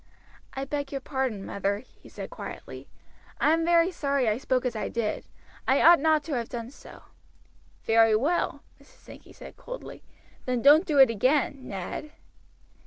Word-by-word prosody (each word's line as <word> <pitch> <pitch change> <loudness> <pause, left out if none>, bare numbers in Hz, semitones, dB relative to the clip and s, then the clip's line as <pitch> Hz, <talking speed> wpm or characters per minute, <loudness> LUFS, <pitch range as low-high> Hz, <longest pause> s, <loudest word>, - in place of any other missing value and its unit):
"I 270 0 -3
beg 285 0 -4
your 275 - -3
pardon, 260 -7 -3
mother," 200 0 -2
he 245 +5 -17
said - - -8
quietly. - - -9 0.5
"I 305 - +3
am 330 0 +1
very 340 +1 +3
sorry 280 -6 -1
I 215 +2 +1
spoke 255 -1 -1
as 245 -2 -2
I 215 - -3
did. 220 -2 -3 0.4
I 265 +2 +3
ought 340 +1 +7
not 310 0 +2
to 305 0 -5
have 235 -3 -2
done 235 0 -6
so." - - -15 0.8
"Very 225 -1 +4
well," 295 +11 0 0.2
Mrs. - - -19
Sankey - - -16
said - - -13
coldly; - - -9 0.5
"then 250 -2 -1
don't 300 +6 +6
do 300 -4 0
it 265 -4 +7
again, 265 +4 0
Ned." 200 +10 -6
265 Hz, 170 wpm, -27 LUFS, 230-300 Hz, 0.8 s, ought